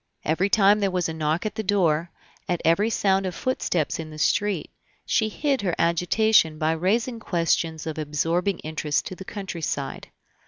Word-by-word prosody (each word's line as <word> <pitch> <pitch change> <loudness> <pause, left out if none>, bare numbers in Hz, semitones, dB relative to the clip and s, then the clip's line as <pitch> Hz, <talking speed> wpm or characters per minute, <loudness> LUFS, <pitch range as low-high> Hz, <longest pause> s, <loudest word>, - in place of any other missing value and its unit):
Every 175 +6 +1
time 205 0 +5
there 200 -1 +1
was 180 -2 0
a 160 - -4
knock 160 +4 -1
at 215 - -2
the 220 - -3
door, 175 -5 +1 0.4
at 175 -1 0
every 185 +7 +3
sound 195 -3 +1
of 180 - -5
footsteps 180 - -1
in 160 -1 -5
the 155 - -10
street, 195 +2 0 0.3
she 220 -1 +1
hid 275 +4 0
her 180 -4 -1
agitation 170 0 +3
by 155 +1 +1
raising 220 +9 0
questions 165 -4 0
of 160 -1 -4
absorbing 165 +5 0
interest 155 -1 -1
to 185 - -6
the 190 - -9
countryside. 170 -9 -4
175 Hz, 170 wpm, -24 LUFS, 160-205 Hz, 0.4 s, time